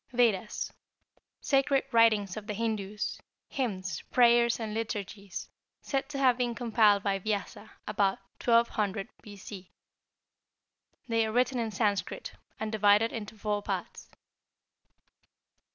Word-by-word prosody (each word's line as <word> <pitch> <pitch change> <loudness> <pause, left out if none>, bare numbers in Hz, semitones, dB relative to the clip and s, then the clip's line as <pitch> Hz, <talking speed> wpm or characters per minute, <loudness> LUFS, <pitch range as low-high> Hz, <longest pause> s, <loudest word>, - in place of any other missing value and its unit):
=Vedas.= 225 -4 +1 0.7
Sacred 275 -1 +2
writings 215 -5 +4
of 215 -1 -7
the 210 - -3
Hindus, 210 -2 -2 0.3
hymns, 190 - -3
prayers, 235 -1 +5
and 220 -2 -4
liturgies, 205 -3 -5 0.4
said 270 0 -2
to 290 - -5
have 255 -2 +3
been 240 -1 0
compiled 215 -4 +3
by 195 -1 0
Vyasa 205 +1 -3 0.2
about 200 -2 +1 0.3
1200 220 -4 +2
B. 205 -3 -11
C. 190 -1 -10 1.4
They 230 -1 +2
are - - -3
written 250 +2 +1
in 230 -1 -1
Sanskrit, 205 -1 -1 0.3
and 220 -1 -3
divided 210 +1 +4
into 220 -1 -6
four 210 0 -1
parts. - - -5
220 Hz, 120 wpm, -29 LUFS, 205-235 Hz, 1.4 s, prayers